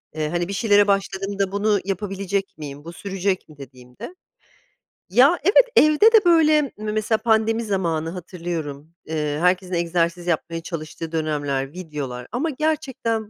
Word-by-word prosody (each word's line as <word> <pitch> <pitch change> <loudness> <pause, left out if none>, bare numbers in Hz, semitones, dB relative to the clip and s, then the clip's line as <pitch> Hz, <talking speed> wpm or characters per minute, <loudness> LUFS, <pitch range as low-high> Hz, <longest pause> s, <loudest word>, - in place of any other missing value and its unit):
eee, 155 -1 -2
hani, 175 +1 -1
bir 200 - -5
şeylere 205 -1 +4
başladığımda 195 0 -1
bunu 205 0 +1
yapabilecek 195 -1 -3
miyim, 145 -1 -8
bu 170 +2 -9
sürecek 195 -1 -3
mi 155 - -15
dediğimde, 125 - -11 0.9
ya, 265 - +5
evet, 415 +7 +6
evde 305 +9 +6
de 425 -5 +6
böyle 310 -3 +5
me 215 -6 -5
mesela 215 +1 0
pandemi 225 0 +1
zamanı 170 -6 -1
hatırlıyorum. 165 -4 -6
Eee, 150 -2 -2
herkesin 180 +1 +1
egzersiz 170 0 -1
yapmaya 165 0 -2
çalıştığı 165 0 -7
dönemler, 145 -4 -2
videolar 145 -8 -6
ama 280 +7 -1
gerçekten 265 -7 -2
185 Hz, 140 wpm, -22 LUFS, 160-215 Hz, 0.9 s, evet